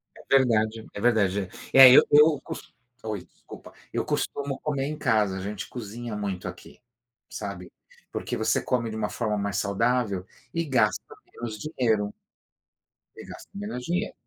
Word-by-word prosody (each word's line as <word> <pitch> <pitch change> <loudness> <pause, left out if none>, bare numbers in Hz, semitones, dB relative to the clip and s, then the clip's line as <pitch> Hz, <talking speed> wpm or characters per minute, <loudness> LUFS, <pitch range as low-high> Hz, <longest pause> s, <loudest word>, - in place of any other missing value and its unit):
É 135 - +2
verdade 110 -3 +1
é 100 - -6
verdade. 100 -5 +2 0.2
É, 135 -1 +11
eu 130 - +9
eu 150 0 +6
cos - - -9 0.3
oi, 105 -4 -4
desculpa - - -14 0.2
eu - - -2
costumo 140 -1 -2
comer 140 -3 -2
em 150 +2 -4
casa, 110 -9 +1
a - - -5
gente 100 +1 -5
cozinha 115 -1 -6
muito 100 -3 -4
aqui, - - -10 0.5
sabe? 100 -4 -7 0.4
Porque - - -3
você 110 +1 +1
come 120 -2 -1
de 110 - -6
uma 105 -1 -2
forma 105 -3 -2
mais 100 -1 -2
saudável 100 -1 0 0.3
e 165 - 0
gasta 120 -7 +2 0.3
menos 115 -2 -6
dinheiro. 110 -7 0 1.0
Você - - -10
gasta - - -11
menos 200 -11 -5
dinheiro, 180 +5 -1
110 Hz, 155 wpm, -26 LUFS, 105-130 Hz, 1.0 s, É